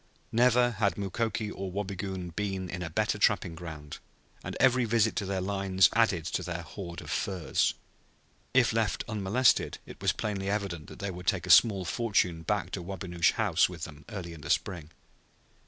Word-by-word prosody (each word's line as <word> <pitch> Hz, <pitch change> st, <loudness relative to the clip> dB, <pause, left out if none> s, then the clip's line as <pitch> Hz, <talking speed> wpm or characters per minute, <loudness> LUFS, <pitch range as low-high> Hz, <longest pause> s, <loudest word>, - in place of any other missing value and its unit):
Never 120 Hz, +1 st, +4 dB
had 100 Hz, -3 st, +2 dB
Mukoki 105 Hz, +2 st, -2 dB
or 95 Hz, 0 st, -5 dB
Wabigoon 95 Hz, -2 st, -4 dB
been 95 Hz, -3 st, -2 dB
in 90 Hz, -, -5 dB
a 85 Hz, -, -3 dB
better 80 Hz, -, 0 dB
trapping 85 Hz, -, +2 dB
ground, 80 Hz, -3 st, -8 dB, 0.4 s
and -, -, -5 dB
every 130 Hz, -1 st, +4 dB
visit 115 Hz, -1 st, +2 dB
to 100 Hz, -, -1 dB
their 95 Hz, -1 st, -1 dB
lines 95 Hz, -1 st, +3 dB
added 105 Hz, -8 st, +2 dB
to 85 Hz, -, -1 dB
their 90 Hz, -1 st, -4 dB
hoard 85 Hz, +1 st, -7 dB
of -, -, -8 dB
furs. 95 Hz, -4 st, 0 dB, 0.8 s
If 125 Hz, -3 st, +4 dB
left 110 Hz, -4 st, 0 dB
unmolested 110 Hz, +4 st, +2 dB
it -, -, -12 dB
was -, -, +3 dB
plainly 100 Hz, -2 st, -3 dB
evident 100 Hz, -7 st, -2 dB
that -, -, -11 dB
they 100 Hz, 0 st, -3 dB
would 90 Hz, 0 st, -9 dB
take -, -, +1 dB
a -, -, +2 dB
small 100 Hz, -5 st, +6 dB
fortune 90 Hz, -5 st, +1 dB
back 80 Hz, -, -1 dB
to -, -, -4 dB
Wabinosh 90 Hz, -2 st, 0 dB
House -, -, +2 dB
with 85 Hz, -3 st, -8 dB
them 75 Hz, -1 st, -8 dB
early 90 Hz, -6 st, -6 dB
in 80 Hz, -, -11 dB
the -, -, -8 dB
spring. 80 Hz, -5 st, -1 dB
95 Hz, 180 wpm, -29 LUFS, 85-105 Hz, 0.8 s, small